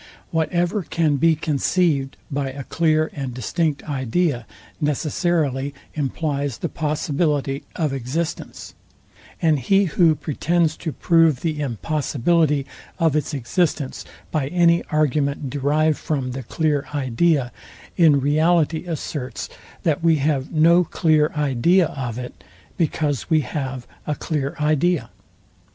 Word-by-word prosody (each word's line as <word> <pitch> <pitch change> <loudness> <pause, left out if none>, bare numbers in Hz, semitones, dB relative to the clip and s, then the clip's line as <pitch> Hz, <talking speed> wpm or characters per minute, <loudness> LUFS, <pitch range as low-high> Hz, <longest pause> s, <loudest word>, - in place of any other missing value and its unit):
Whatever 175 +5 0
can 155 -4 0
be 165 +3 +4
conceived 150 -2 0
by 140 -1 -1
a 135 +1 -7
clear 155 +1 +1
and 135 -4 -5
distinct 150 - -1
idea 135 -1 -1 0.3
necessarily 145 -2 0 0.2
implies 145 -2 -2
the - - -3
possibility 150 -2 -1
of 155 -5 -1
existence; 135 +6 -4 0.7
and 155 -3 +3
he 195 +10 +3
who 165 -1 +3
pretends 160 +2 0
to 160 - -4
prove 165 -4 +3
the 155 -3 -2
impossibility 145 - 0 0.3
of 160 -3 +2
its 150 -1 0
existence 140 +2 -1 0.3
by 150 -4 0
any 170 +1 +3
argument 145 -2 0
derived 150 +3 +1
from 135 -5 -2
the 135 +2 -5
clear 145 +3 -1
idea, 135 0 +1 0.4
in 155 -5 +5
reality 155 +3 +2
asserts, 145 -7 -5 0.3
that 160 -1 0
we 165 -1 +5
have 140 -2 0
no 170 +3 +5
clear 155 -2 +2
idea 150 +6 +3
of 125 -7 -5
it, 125 0 -8 0.3
because 150 - -1
we 160 -2 +4
have 130 -3 -4 0.2
a 150 - 0
clear 145 -3 -3
idea. 155 +3 +1
150 Hz, 120 wpm, -22 LUFS, 135-165 Hz, 0.7 s, in